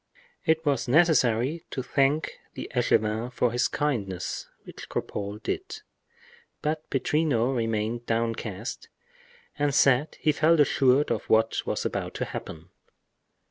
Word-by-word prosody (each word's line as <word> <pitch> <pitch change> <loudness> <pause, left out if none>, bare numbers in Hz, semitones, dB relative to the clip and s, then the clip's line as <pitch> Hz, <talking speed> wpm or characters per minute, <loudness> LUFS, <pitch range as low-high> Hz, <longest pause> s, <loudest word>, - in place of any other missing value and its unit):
It 160 0 +2
was 140 -5 +1
necessary 145 -1 +3
to 130 - -4
thank 140 +4 +1 0.2
the - - -6
echevin 110 +3 +1
for 125 -1 +1
his 120 +1 +2
kindness, 100 -12 -2 0.2
which - - -11
Cropole 100 0 -4
did. 410 +3 -4 0.8
But 155 +1 -2
Pittrino 135 -3 +1
remained 115 0 -1
downcast 115 -1 -3 0.7
and 145 -1 +1
said 140 +1 +3
he 155 - +3
felt 160 +2 +3
assured 140 -1 +3
of - - -1
what 110 0 +3
was - - -2
about - - -3
to - - -2
happen. 80 +1 -8
130 Hz, 125 wpm, -27 LUFS, 115-150 Hz, 0.8 s, necessary